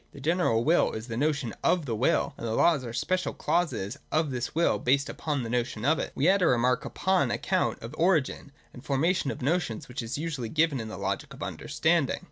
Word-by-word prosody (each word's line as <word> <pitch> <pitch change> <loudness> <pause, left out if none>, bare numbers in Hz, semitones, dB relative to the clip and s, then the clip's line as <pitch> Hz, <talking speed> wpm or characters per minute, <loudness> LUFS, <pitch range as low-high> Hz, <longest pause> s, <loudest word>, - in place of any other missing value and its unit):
The - - -11
general 150 -6 +1
will 165 +6 +3
is 110 0 -5
the 115 - -3
notion 140 -3 0
of 175 -4 +2
the 115 -4 -2
will: 120 +5 +1
and 115 - -5
the 110 - -1
laws 155 -6 +3
are - - -6
the 115 - -6
special 185 +5 -1
clauses 130 - -1
of 155 -2 +1
this 125 +1 -4
will 170 +1 +3
and - - -12
based 140 +3 +2
upon 145 -5 -2
the - - -4
notion 120 -2 -1
of 155 +3 +3
it. - - 0
(2) - - -13
We 145 - +2
add 195 +1 +4
a 180 - +4
remark 125 +1 +2
upon 190 -7 +1
the - - 0
account - - -1
of 115 - -6
the 155 - -12
origin 160 -5 +1 0.2
and 125 - -12
formation 150 +2 +1
of 140 - -5
notions 150 -6 -1
which 125 +1 -5
is 115 +3 -4
usually 150 -7 -3
given 155 -2 +2
in 110 - -5
the 110 - -7
Logic - - -3
of - - -7
Understanding. - - 0
140 Hz, 245 wpm, -28 LUFS, 120-165 Hz, 0.2 s, add